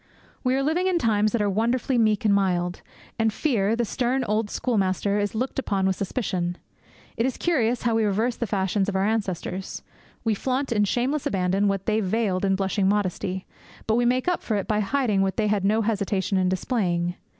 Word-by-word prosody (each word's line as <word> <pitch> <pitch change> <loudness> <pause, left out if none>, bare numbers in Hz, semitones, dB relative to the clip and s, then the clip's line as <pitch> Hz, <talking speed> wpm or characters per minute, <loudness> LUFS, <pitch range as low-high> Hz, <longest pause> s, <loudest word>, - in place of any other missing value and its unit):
We 255 0 +2
are 270 - +1
living 335 +6 +1
in 370 -2 +2
times 215 -6 +2
that 225 -1 +1
are - - +1
wonderfully 235 +5 +1
meek 215 0 +2
and 205 - +4
mild; 180 -3 0 0.4
and 225 0 +3
Fear, 220 -5 +1
the 235 0 0
stern 255 +3 0
old 215 -1 0
schoolmaster, 200 -3 0
is 205 +1 -2
looked 255 +4 -2
upon 195 -7 0
with 190 0 +2
suspicion. 180 -4 -2 0.6
It 230 - +1
is 260 - -3
curious 250 -8 +1
how 235 -2 +2
we 225 0 +2
reverse 220 +4 +1
the 235 - -3
fashions 195 0 0
of 195 - -3
our 190 +1 +2
ancestors. 195 -3 -3 0.4
We 225 - +2
flaunt 260 +5 -2
in 210 -3 +3
shameless 255 +7 0
abandon 190 +1 +1
what 195 -1 -1
they 215 0 +1
veiled 200 -2 0
in 195 0 +2
blushing 195 0 +1
modesty; 190 -2 -1 0.4
but 220 - +1
we 240 +2 +2
make 255 +4 +1
up 360 - +1
for 220 - -2
it 200 - -2
by 210 -1 +1
hiding 215 -2 +1
what 190 0 0
they 220 - +1
had 205 -2 +1
no 215 +3 +2
hesitation 200 -2 -1
in 185 -1 +2
displaying. 180 -3 0
210 Hz, 205 wpm, -25 LUFS, 195-240 Hz, 0.6 s, and